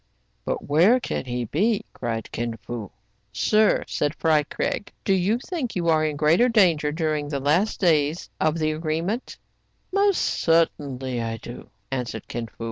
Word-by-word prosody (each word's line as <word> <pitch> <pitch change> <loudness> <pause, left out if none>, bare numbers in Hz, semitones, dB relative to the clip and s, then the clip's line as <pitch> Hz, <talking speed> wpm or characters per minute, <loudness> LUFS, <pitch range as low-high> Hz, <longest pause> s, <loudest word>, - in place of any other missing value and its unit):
" - - -44
But - - -3
where 175 - +5
can 235 - -3
he 125 -1 -3
be 200 - +1
} - - -44
" - - -47
cried 115 -2 -4
Kin 115 0 -3
Fo. 115 -3 -7 0.4
"Sir," 215 - +3
said 150 +2 -1
Fry 155 -2 +3
Craig, 150 +6 -3
"do 195 - +3
you 190 +4 +2
think 270 -3 -4
you 170 -2 0
are 155 -1 +3
in 155 -1 -1
greater 160 +12 +4
danger 170 -10 +3
during 155 -2 -1
the 140 -2 -2
last 165 +10 +1
days 155 -3 +2
of 155 +1 +1
the 155 -1 +1
agreement 165 +9 -3 0.2
} - - -45
" - - -44
"Most 400 -1 +3
certainly 135 -6 0
I 115 0 -3
do," 120 +2 -10 0.2
answered 125 -4 -4
Kin 115 -1 -4
Fo. - - -23
155 Hz, 185 wpm, -24 LUFS, 130-190 Hz, 0.4 s, where